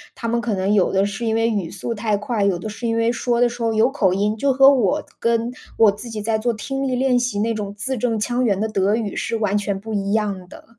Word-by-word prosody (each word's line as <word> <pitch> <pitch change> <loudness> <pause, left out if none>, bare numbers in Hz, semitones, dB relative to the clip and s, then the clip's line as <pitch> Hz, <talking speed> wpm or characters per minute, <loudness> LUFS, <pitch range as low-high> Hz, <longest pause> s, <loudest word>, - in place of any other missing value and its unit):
他 230 - -5
们 235 +1 0
可 230 -4 -1
能 190 +2 0
有 195 -3 +3
的 195 +1 +2
是 205 +4 -5
因 225 -1 0
为 225 0 +2
语 200 -7 -1
速 200 +4 -4
太 210 -1 -1
快， 210 0 -2
有 195 -3 +2
的 195 - -6
是 230 +3 -5
因 230 0 0
为 230 +1 +2
说 240 0 -1
的 245 - +5
时 240 0 -7
候 225 -1 +1
有 220 +2 +3
口 195 -10 +2
音， 210 +2 0
就 275 +5 +1
和 270 +1 +7
我 275 +5 +1 0.2
跟 230 +1 0 0.3
我 220 -3 +6
自 220 +4 -9
己 215 -2 -5
在 220 0 0
做 240 +2 0
听 270 +5 -3
力 255 - 0
练 255 -1 +2
习 245 -4 -2
那 225 +2 +1
种 205 -2 -4
字 260 +6 -2
正 225 -2 0
腔 245 +3 0
圆 200 -4 +1
的 220 - 0
德 205 0 +1
语 215 -4 -3
是 - - -2
完 210 -2 0
全 200 -1 -1
不 220 +2 -7
一 200 0 -1
样 200 -4 -1
的。 - - -13
220 Hz, 300 characters per minute, -21 LUFS, 205-240 Hz, 0.3 s, 和